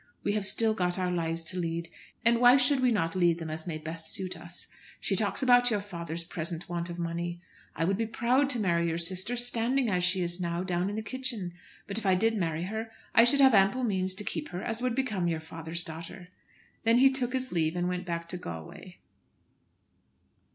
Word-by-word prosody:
We - - +1
have 205 -2 0
still 225 0 +2
got 180 -3 0
our 180 -1 0
lives 165 -1 -1
to 180 +3 -4
lead. 170 0 -2 0.4
And 235 0 +4
why 245 +2 +8
should 270 +1 +3
we 255 -1 +3
not 165 -6 0
lead 175 -2 +3
them 165 -2 -5
as 160 +2 -5
may 160 -3 -3
best 160 +1 -6
suit 185 -3 -3
us? 170 +1 -7 0.3
She - - -1
talks - - +1
about 245 -1 +6
your 210 -3 +1
father's 170 -4 -6
present 165 0 -5
want 170 0 -3
of 170 - -6
money. 170 0 -3 0.4
I 165 - 0
would 195 +2 +1
be 225 - 0
proud 250 +5 +2
to 250 -4 +1
marry 170 -4 +1
your 165 0 -1
sister 185 +7 0
standing 240 +1 +1
as 180 -1 +1
she 180 +1 +2
is 175 +1 -3
now 170 0 -1
down 180 0 -1
in 205 - -4
the 220 - -3
kitchen. 230 -7 -3 0.3
But 200 +2 -1
if 215 - -8
I 190 - +5
did 225 +4 +2
marry 165 -4 -1
her 220 +4 -4 0.2
I 230 - +7
should 275 +4 +6
have 265 -2 +7
ample 200 +6 +4
means 190 -4 0
to 210 - -2
keep 160 -6 -4
her 175 +1 -5
as 225 0 -2
would 250 -2 0
become 215 -10 0
your 165 -2 0
father's 165 +1 -4
daughter." 165 +3 -8 0.5
Then 230 +1 +4
he 265 +2 +6
took 255 -2 -2
his 260 0 -2
leave 160 -1 0
and 175 0 0
went 180 0 -3
back 170 -1 -3
to 180 - -3
Galway. 80 - -8
185 Hz, 220 wpm, -29 LUFS, 170-230 Hz, 0.5 s, why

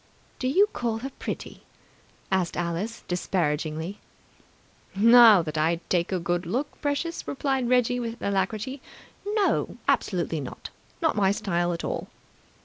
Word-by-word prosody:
"Do 255 - -1
you 375 +10 +5
call 230 -2 -1
her 270 - -4
pretty?" - - -6 0.7
asked 185 -3 0
Alice 175 +7 -3
disparagingly. 165 0 -1 1.0
"Now 225 -2 +8
that 155 -1 -3
I 165 +2 +2
take 175 0 +1
a 185 - +1
good 175 0 -2
look, 260 - -3
precious," 290 +4 -2
replied 270 -3 -1
Reggie 250 0 +3
with 230 0 -4
alacrity, 210 +7 -2 0.4
"no! 410 -1 0
Absolutely - - +1
not! - - -8 0.3
Not 320 - +2
my 200 -2 +3
style 185 -5 0
at 170 - -4
all!" - - -3
205 Hz, 135 wpm, -26 LUFS, 175-250 Hz, 1.0 s, Now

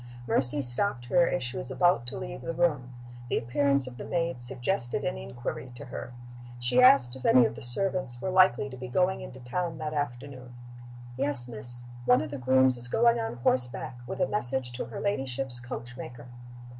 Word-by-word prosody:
Mercy 135 +4 +1
stopped 120 +1 -3
her 170 +7 +2
as 135 - -3
she 125 +1 -6
was 130 - -7
about 135 -3 +1
to - - +6
leave - - -8
the 165 - -6
room. 150 -8 -1 0.4
The - - -1
appearance 140 +3 0
of 125 -1 -10
the - - -8
maid 170 -6 -3
suggested 120 +2 -4
an - - -3
inquiry 65 - -8
to 140 - -10
her. 125 -1 -9 0.5
She 120 - +1
asked 250 - +4
if 130 - -12
any 125 -2 +4
of 110 - -3
the - - -11
servants 125 -1 +6
were 185 - -4
likely 185 -8 +3
to 130 - -10
be 125 0 -8
going 180 +9 -1
into 130 - -11
town 165 +7 -5
that 155 0 -6
afternoon. 130 -3 -6 0.6
"Yes, 135 -2 +6
miss. 120 +1 +4 0.2
One 125 +4 +3
of 155 - -8
the 140 - -7
grooms 130 0 +2
is 120 0 -3
going 235 - +2
on 225 - -5
horseback, 125 -1 -2
with - - -7
a 180 - +1
message 130 -9 -3
to 120 - -6
her 115 - -9
ladyship's 135 -8 -3
coach 125 0 -9
maker." 120 -1 -10
130 Hz, 195 wpm, -27 LUFS, 120-150 Hz, 0.6 s, to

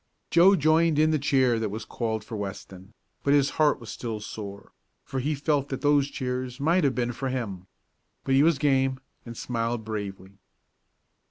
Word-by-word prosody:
Joe 185 +4 +6
joined 160 0 +3
in 155 +1 +4
the 155 - +1
cheer 130 -4 +2
that 110 -2 -1
was 110 +2 -6
called 110 -2 -3
for 110 +1 -7
Weston, 95 -1 -7 0.3
but 140 0 +4
his 140 -1 +3
heart 150 -3 +4
was 115 - -9
still 115 -3 -5
sore, 100 -1 -8 0.3
for 135 - -4
he 150 +4 -1
felt 145 -1 0
that 135 - -4
those 145 -1 +3
cheers 125 -1 -4
might 165 +6 +2
have 135 -3 +2
been 120 -1 0
for 130 +3 -4
him. 100 -8 -4 0.6
But 135 - 0
he 135 - +5
was 160 0 +4
game, 135 -2 +1 0.3
and 115 -1 -8
smiled 115 -1 -2
bravely. 100 -2 -6
130 Hz, 180 wpm, -26 LUFS, 110-145 Hz, 0.6 s, Joe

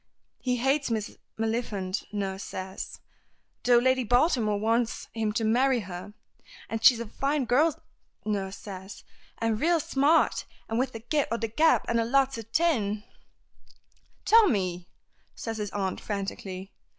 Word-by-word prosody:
"He 250 -1 0
hates 270 +3 +1
Miss 220 -2 -2 0.2
Maliphant, 220 -4 -2
nurse 195 -2 -3
says, 190 0 -6 0.6
though 245 -1 +6
Lady 260 +1 +3
Baltimore 245 - +2
wants 230 +2 0
him 220 -2 -1
to 225 - 0
marry 245 +3 +3
her, 185 +2 -8 0.6
and 225 0 -3
she's 235 -1 +7
a 235 - -3
fine 275 +5 -1
girl, 285 +6 +3 0.5
nurse 200 -2 -2
says, 190 -1 -9 0.3
an' 225 -1 0
raal 335 +7 +3
smart, 290 +2 +2 0.2
and 225 +1 -1
with 260 0 0
the 225 - -7
gift 290 +3 0
o' 230 - +1
the 225 -1 -3
gab, 310 +9 +4
an' 235 - +1
lots 270 -2 +3
o' 225 0 -10
tin 215 -11 +1 0.5
" - - -33
"Tommy!" 195 - +3 0.5
says 225 -1 -5
his 205 -1 -2
aunt 190 -1 -2
frantically. 195 -2 -5
225 Hz, 145 wpm, -28 LUFS, 205-260 Hz, 0.6 s, she's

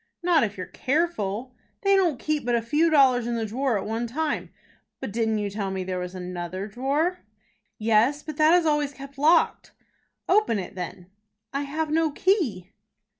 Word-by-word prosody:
"Not 340 -5 +4
if 205 -3 -2
you're 185 - -4
careful." 255 - -1 0.3
"They 395 0 +5
don't 350 -8 +2
keep 305 +3 -1
but 240 0 +1
a 235 - +1
few 300 +8 +2
dollars 260 -6 +4
in 240 - -1
the 225 -1 -1
drawer 245 +2 0
at 195 - -4
one 225 +2 -2
time." 300 +6 -2 0.5
"But 200 - -5
didn't 220 -1 +1
you 205 -1 -2
tell 200 -1 -3
me 190 -1 -3
there 185 0 -3
was 180 +1 -6
another 180 +1 -5
drawer?" 280 - -1 0.6
"Yes; 230 +7 +2
but 305 -2 -7
that 310 +2 +6
is 350 -2 +3
always 295 -2 +1
kept 275 0 -11
locked." 320 +3 +3 0.5
"Open 400 - +3
it 190 - -5
then." 180 0 -7 0.4
"I 275 - -1
have 310 +1 -2
no 320 0 +2
key." 285 - 0
255 Hz, 180 wpm, -25 LUFS, 205-310 Hz, 0.6 s, that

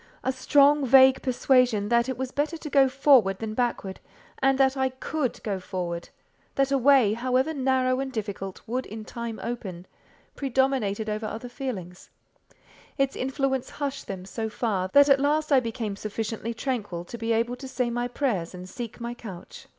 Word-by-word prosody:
A 260 - +1
strong, 280 +2 +4
vague 265 0 +6
persuasion 250 -5 +2
that 235 +1 +3
it 260 - -3
was 260 0 -3
better 300 +4 -1
to 310 - -7
go 270 -2 +5
forward 255 -8 +4
than 220 +1 -4
backward, 220 -5 -2 0.4
and 270 0 +3
that 265 0 +3
I 265 -1 +1
could 260 +1 -3
go 200 -3 -2
forward—that 180 +9 -4
a 275 - +4
way, 260 -5 +5
however 255 +6 0
narrow 260 -2 +1
and 270 0 -3
difficult, 200 -4 -5
would 250 +3 -3
in 215 0 -8
time 235 -1 -6
open—predominated 235 +2 -3
over 215 +1 -2
other 225 +3 -6
feelings: 215 -9 -6 0.9
its 275 -1 +1
influence 265 0 -1
hushed 280 -2 -4
them 185 -2 -6
so 220 +3 -4
far, 210 -5 -1
that 285 0 +7
at 275 -1 +5
last 300 +2 +1
I 275 - +7
became 230 -4 -4
sufficiently 220 +2 -4
tranquil 220 -9 -3
to 235 - -8
be 225 0 -1
able 230 +2 +1
to 265 - -8
say 250 -2 -1
my 240 +1 -1
prayers 230 -10 -2
and 180 0 -8
seek 230 +5 -7
my 235 0 -4
couch. 200 -7 -10
245 Hz, 170 wpm, -26 LUFS, 215-265 Hz, 0.9 s, that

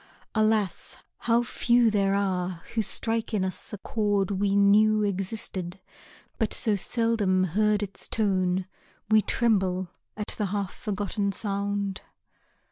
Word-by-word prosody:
Alas, 215 -4 +1 0.3
how 235 +1 +4
few 240 -1 +3
There 195 -1 +2
are 185 -3 -1
who 225 - +1
strike 225 +1 -2
in 190 -2 +1
us 185 -1 -3
a 210 - -5
chord 205 -2 0
we 200 0 +1
knew 210 +2 +5
Existed, 190 -2 -3 0.6
but 220 -3 +1
so 215 -2 +1
seldom 205 -3 +1
heard 210 +4 +2
its 200 -1 -4
tone 185 -4 +1 0.5
We 215 0 +6
tremble 190 -6 +1 0.3
at 210 - -4
the 210 - +1
half 200 -1 -3
forgotten 205 -1 -2
sound. 200 -1 -2
200 Hz, 125 wpm, -27 LUFS, 190-215 Hz, 0.6 s, We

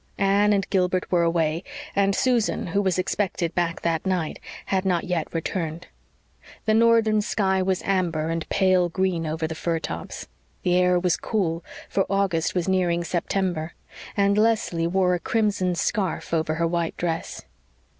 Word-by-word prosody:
Anne 200 +1 +3
and 195 -2 +1
Gilbert 185 -1 +1
were 175 -2 +3
away, 165 0 +1 0.3
and 200 0 +2
Susan, 245 -4 +1
who 190 +4 0
was 190 -3 +1
expected 185 -2 -1
back 170 -1 -1
that 165 -2 0
night, 180 -5 -1 0.3
had 190 -1 0
not 180 -3 +1
yet 180 -4 -2
returned. 165 0 -3 0.8
The 215 - +3
northern 225 -1 +4
sky 190 -2 +1
was 185 0 0
amber 170 -5 0
and 165 0 -3
pale 185 -2 +3
green 175 -2 -1
over 160 +1 -2
the 160 - -3
fir 165 +1 -1
tops. 85 - -6 0.4
The 180 -1 +2
air 180 0 +4
was 180 -1 +1
cool, 170 -6 -1 0.2
for 195 - 0
August 190 -5 0
was 180 -1 0
nearing 175 -2 +1
September, 175 -1 -2 0.4
and 200 +1 +3
Leslie 215 -7 +1
wore 180 0 +2
a 175 - 0
crimson 205 -4 0
scarf 190 -1 -1
over 155 -1 +1
her 170 +1 0
white 170 -1 -1
dress. 165 -1 -3
180 Hz, 160 wpm, -24 LUFS, 165-195 Hz, 0.8 s, northern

